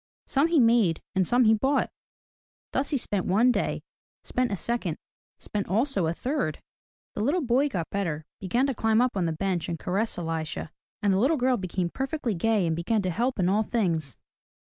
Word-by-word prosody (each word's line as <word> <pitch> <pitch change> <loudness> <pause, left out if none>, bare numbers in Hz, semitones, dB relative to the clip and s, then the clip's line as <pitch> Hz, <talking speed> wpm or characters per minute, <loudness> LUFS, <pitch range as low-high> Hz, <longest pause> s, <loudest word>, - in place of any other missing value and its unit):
Some 280 +4 +2
he 335 -2 +3
made 230 -8 +4
and 190 -2 +2
some 245 +1 +4
he 220 -1 +6
bought. 265 +6 +1 0.8
Thus 275 +1 0
he 290 - +1
spent 205 -6 -2
one 225 +7 +4
day, - - -1 0.4
spent 250 -2 -1
a 200 - -1
second, 190 -4 -2 0.4
spent 205 -2 -4
also 205 - +1
a 160 - 0
third. 285 - -2 0.5
The - - -3
little 295 +11 +1
boy 265 +4 +2
got 175 - -4
better, 165 -6 -2
began 235 +8 +1
to 275 - 0
climb 225 -1 +2
up 250 -1 +2
on 185 -3 +1
the 165 - 0
bench 175 +1 -2
and 170 - -2
caress 200 +7 -1
Elisha. 165 -2 -4 0.3
And 200 -2 +3
the 190 - +2
little 285 +8 +3
girl 255 0 +2
became 185 -4 -2
perfectly 270 -3 -2
gay 210 +1 +1
and 165 -1 0
began 200 +6 0
to 185 - 0
help 245 +8 0
in 180 -3 +2
all 200 +3 +3
things. 170 - -1
210 Hz, 195 wpm, -27 LUFS, 180-250 Hz, 0.8 s, he